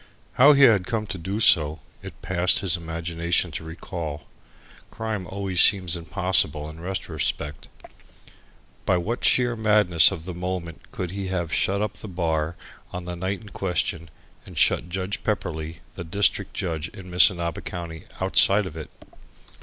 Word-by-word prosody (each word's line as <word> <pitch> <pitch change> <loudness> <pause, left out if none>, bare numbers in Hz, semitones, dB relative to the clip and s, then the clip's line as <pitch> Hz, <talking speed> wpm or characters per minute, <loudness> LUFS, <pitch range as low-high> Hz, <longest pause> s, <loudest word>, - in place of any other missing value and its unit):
How 145 +4 +7
he 140 0 +5
had 100 -8 +5
come 110 -2 -2
to 95 - -5
do 95 +6 -3
so, 80 -7 +4 0.2
it - - -11
passed 90 -1 +2
his 90 -4 +2
imagination 85 +1 -1
to 75 - -5
recall. 80 -2 -6 0.7
Crime 110 -5 -4
always 95 -1 +1
seems 95 -5 +5
impossible 85 -3 +1
in 80 +1 -10
retrospect. 85 -4 -3 1.2
By 90 - +2
what 110 +8 -3
sheer 120 -2 +3
madness 105 -9 +4
of 85 -5 -7
the 90 - -5
moment 90 -1 -6
could 90 -2 -5
he 100 0 -4
have 85 -3 -3
shut 100 +2 +1
up 105 - -4
the - - -9
bar 85 -3 -2 0.4
on 90 0 -6
the 90 0 -5
night 95 +4 -3
in 105 - -12
question, 85 -4 -2 0.3
and - - -13
shut 85 - +3
Judge 95 +2 -3
Pepperleigh, 80 -6 -3
the 85 - -7
district 100 +3 0
judge 85 -4 -3
in 90 -1 -11
Missinaba 85 -2 +3
County, 85 -2 -7
outside 95 +2 +4
of 85 -4 -8
it? 80 - -8
90 Hz, 155 wpm, -24 LUFS, 80-100 Hz, 1.2 s, How